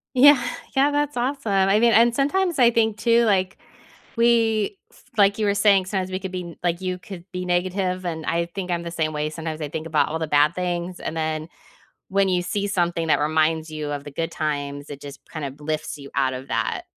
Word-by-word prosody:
Yeah. 280 +1 +7 0.3
Yeah. 275 +2 +4
That's 290 -1 -1
awesome, 250 -2 -1
I 195 +1 +4
mean, 235 +1 +5
and 235 +1 +5
sometimes 335 +4 +1
I 240 -2 +7
think 220 -2 +1
too, 235 +1 +3
like, 190 -3 +1 0.6
we 230 - +2 0.4
like 200 0 +4
you 215 - +1
were 200 - +2
saying, 200 -2 +4
sometimes 190 -1 -2
we 185 - -2
could 190 -1 -6
be 180 -2 -6
like 175 0 0
you 185 -1 -3
could 180 -2 -10
be 180 0 -3
negative, 185 +1 -1
and 160 -2 -4
I 170 0 +1
think 190 -2 -4
I'm 170 -1 -1
the 170 - -6
same 160 -2 -1
way. 150 0 -1
Sometimes 160 0 -5
I 150 - -3
think 160 +2 -5
about 155 -2 +2
all 160 +1 -3
the 160 - -2
bad 150 +2 +4
things, 180 0 -3
and 165 - -4
then 155 0 -2 0.6
when 195 0 +2
you 180 -1 +1
see 200 +3 -2
something 175 -4 0
that - - +3
reminds 155 +1 +1
you 155 -1 -4
of 145 -1 -4
the 145 - -8
good 165 +4 -3
times, 145 -2 -3
it 145 -1 -8
just 140 -1 -9
kind 155 -3 -5
of 140 +1 -7
lifts 155 +1 -3
you 140 -1 -10
out 130 -1 +1
of 130 +1 -7
that, 115 0 -1
180 Hz, 225 wpm, -23 LUFS, 155-205 Hz, 0.6 s, Yeah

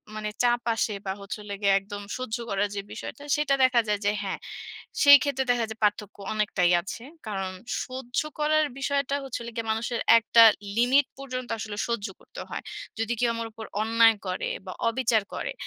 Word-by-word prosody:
মানে 215 0 -3
চাপ 240 0 +3
আসে 220 -1 0
বা, 190 - -1
হচ্ছে 200 +2 -6
হলে 205 -1 -7
গিয়া 200 -1 +4
একদম 205 +1 -8 0.2
সহ্য 255 -2 -3
করা 200 0 +1
যে 200 - -2
বিষয়টা 285 - -8
সেটা 295 -2 +1
দেখা 250 -2 +5
যায় 210 -1 +1
যে 205 - +4
হ্যাঁ, 195 - -3 0.6
সেইক্ষেত্রে 285 -2 +6
দেখা 245 -1 +3
যায় 220 - -7
যে - - -11
পার্থক্য 210 -1 0 0.2
অনেকটাই 200 -4 +2
আছে। 195 +5 -7 0.2
কারণ 195 -3 -3 0.3
সহ্য 255 -1 -3 0.2
করার 310 +1 +3
বিষয়টা 280 0 0
হচ্ছে 265 - -4
হলো 235 0 -7
গিয়া 230 -1 -3
মানুষের 230 +2 -2 0.2
একটা 230 0 +5 0.3
লিমিট 255 +4 +4
পর্যন্ত 255 -2 -5
আসলে 215 -1 -5
সহ্য 235 -3 -1
করতে - - -11
হয়। - - -4 0.4
যদি 225 +1 -1
কেউ 240 -1 +3
আমার 230 0 -3
উপর 220 +1 -8 0.2
অন্যায় 225 0 +5
করে 185 0 -2 0.2
বা, 185 - -5 0.2
অবিচার 230 -2 +2
করে, - - -3
230 Hz, 185 wpm, -26 LUFS, 210-255 Hz, 0.6 s, সেইক্ষেত্রে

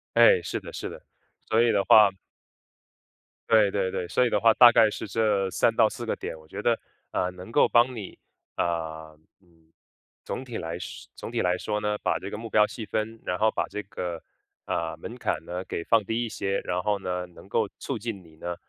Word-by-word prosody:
哎， - - +7
是 - - -3
的， - - -10
是 - - -5
的。 - - -10 0.5
所 110 +1 +4
以 120 - +4
的 100 -2 +2
话 105 -2 +7 1.4
对 110 -3 +5
对 95 -2 0
对， 90 - -3
所 125 +8 +2
以 - - +2
的 - - +2
话 115 +2 +5
大 120 +1 +9
概 115 -2 +5
是 105 - -6
这 100 -2 +1
3 115 +4 +2
到 110 -2 +5
4 120 +1 -7
个 115 - -1
点， 80 - -6
我 80 - -17
觉 80 - -7
得， 115 +1 +2 0.3
呃， 90 - 0
能 90 +3 -11
够 - - +5
帮 120 +1 +3
你， 105 -4 -7 0.4
呃， 80 -2 -3 0.2
嗯， 80 -3 -29 0.5
总 130 - -5
体 120 -3 -6
来 85 +1 -4
说 - - -8
总 - - -7
体 120 - 0
来 90 -2 +2
说 105 +3 -2
呢， 105 0 0
把 - - +1
这 - - -7
个 - - -4
目 115 +1 -7
标 105 -1 +5
细 110 - -7
分， 110 +2 -3
然 90 - -2
后 110 +1 +4
把 - - -1
这 105 - -5
个， 90 -3 -5 0.4
呃， 80 -1 -2
门 115 +8 -8
槛 120 - -2
呢， 90 +1 -4
给 85 - -4
放 115 +3 +3
低 115 +4 -1
一 - - -4
些， 100 -2 -2
然 90 0 -2
后 105 0 +1
呢， 90 -2 -3
能 90 -1 -15
够 - - +1
促 - - -4
进 110 -3 -5
你 80 -2 -19
呢， 85 +2 -4
105 Hz, 230 characters per minute, -26 LUFS, 90-115 Hz, 1.4 s, 大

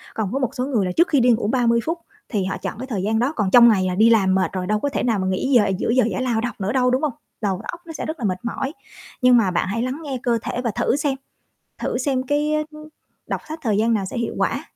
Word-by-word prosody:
còn 215 -3 -2
với 270 - -1
một 250 - -2
số 250 0 -1
người 230 -9 0
là 180 - -1
trước 340 - +5
khi 285 - +3
đi 250 - +4
ngủ 225 -2 +1
30 235 -1 +2
phút, 335 +2 -2 0.3
thì 205 -5 -1
họ 190 - -3
chọn - - -5
cái 260 - -5
thời 200 -7 -3
gian 220 +2 +1
đó, 265 +6 +1
còn 205 -4 0
trong 235 -1 +8
ngày 190 -4 +3
là 180 - -1
đi 220 +4 +5
làm 195 -5 +4
mệt 190 - +1
rồi 185 -1 -3
đâu 210 0 +1
có 285 - -1
thể - - -2
nào 225 -5 +1
mà 185 - -1
nghỉ 190 +9 -1
giờ 220 - +5
giữa 215 - -2
giờ 255 +1 +4
giải - - -2
lao 235 -3 0
đâu 240 0 -2
nữa 200 +2 -1
đâu, 250 -1 +2
đúng 255 +3 +1
hông? 300 -4 0 0.3
Đầu 195 -3 -1
óc 340 - -10
nó 325 - -8
sẽ - - -5
rất 315 -1 -5
là 235 - -2
mệt 185 -2 0
mỏi. 270 +4 -3 0.5
Nhưng 250 -1 +6
mà 200 -6 +2
bạn 175 - 0
hãy 215 +4 -2
lắng 255 +5 -3
nghe 270 -3 -3
cơ 235 -1 +2
thể 245 - -3
và 235 - 0
thử - - +1
xem, 285 -1 0 0.6
thử - - -2
xem 260 0 0
cái, 295 +3 0
ơ, 305 - +1
ưm, 305 0 -12 0.4
đọc - - -3
sách 315 +1 -5
thời 215 -6 +1
gian 230 +2 +2
nào 200 - 0
sẽ 190 - -6
hiệu 235 - -2
quả. - - 0
235 Hz, 305 wpm, -22 LUFS, 210-270 Hz, 0.6 s, trong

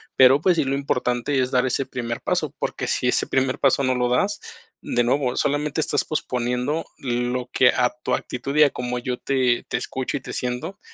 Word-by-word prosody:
Pero, 130 +1 +7
pues 180 -1 +3
sí, 155 - +3
lo 135 0 -1
importante 130 0 0
es 130 0 0
dar 125 0 +2
ese 130 +1 0
primer 120 -1 -4
paso, - - -1
porque - - -3
si - - 0
ese - - +1
primer 130 -1 0
paso 135 0 +3
no 130 -1 +2
lo 125 0 +1
das, 200 +12 +1 0.4
de 120 - 0
nuevo, 125 0 +1
solamente 145 +2 0
estás 145 - 0
posponiendo 125 +1 -2
lo 125 0 -2
que 125 - +5
a 125 -1 +1
tu - - -1
actitud 140 +3 -5
y 150 - +7
a 145 - +5
como 125 -1 -4
yo 125 0 -3
te 130 -3 +1
te - - 0
escucho 130 +3 -3
y - - -9
te - - -8
siento. 125 +9 -4
130 Hz, 210 wpm, -23 LUFS, 125-140 Hz, 0.4 s, Pero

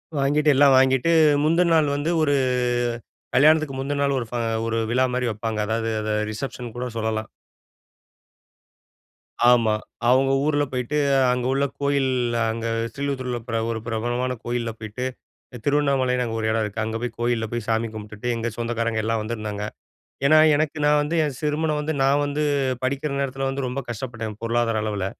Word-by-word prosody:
வாங்கிட்டு 145 +2 +2
எல்லாம் 140 0 +6
வாங்கிட்டு 130 +3 +3 0.3
முந்தின 170 +2 +3
நாள் 155 -2 +3
வந்து 145 +4 -1
ஒரு 145 -2 +2 1.0
கல்யாணத்துக்கு 155 0 +4
முந்தின 140 +1 -2
நாள் 140 0 +1
ஒரு 120 - -4
ஃப - - -13 0.3
ஒரு 115 0 -1
விழாமாரி 125 0 +1
வப்பாங்க. 110 +1 -3
அதாவது, 115 +1 -1
அத 110 0 -2 0.2
ரிசப்ஷன்னு 120 0 -6
கூட 125 - -3
சொல்லலாம். 110 -1 -2 2.2
ஆமா. 115 -3 +4 0.4
அவுங்க 135 +2 +4
ஊர்ல 145 -1 +2
போயிட்டு 125 +3 -2 0.3
அங்க 125 0 -1
உள்ள 140 +1 +1 0.2
கோயில் 140 -1 +1 0.4
அங்க 115 0 -5 0.3
ஸ்ரீலிபுத்தூரில 130 -1 -3
பிர 115 -1 -1
ஒரு 115 - -3
பிரபலமான 120 +3 -1
கோயில்ல 120 -1 -2
போயிட்டு 110 +4 -5 0.6
திருவண்ணாமலைன்னு 135 -3 +2
அங்க 115 -1 -4
ஒரு 110 - -1
இடம் 110 0 +1
இருக்கு. 105 +1 -3
அங்க 110 0 -4
போய் 120 -1 -3
கோயில்ல 120 -1 0
போய் 120 -2 -3
சாமி 115 0 +1
கும்பிட்டுட்டு 105 +1 -7
எங்க 115 0 -2
சொந்தக்காரங்க 115 -1 -1
எல்லாம் 115 0 0
வந்திருந்தாங்க. 105 -2 -4 0.6
ஏன்னா, 155 +3 +6 0.2
எனக்கு 155 +1 0
நான் 150 0 +4
வந்து 150 +3 -3
என் 150 -3 -1
திருமணம் 150 0 0
வந்து 150 +1 -2
நான் 140 +2 +3
வந்து 145 +1 -2 0.4
படிக்கிற 140 +3 -1
நேரத்தில 135 0 -2
வந்து 135 0 -3
ரொம்ப 125 +2 -3
கஷ்டப்பட்டேன், 110 -2 -5
பொருளாதார 115 -1 0
அளவுல. 105 -3 -2
125 Hz, 155 wpm, -23 LUFS, 115-140 Hz, 2.2 s, எல்லாம்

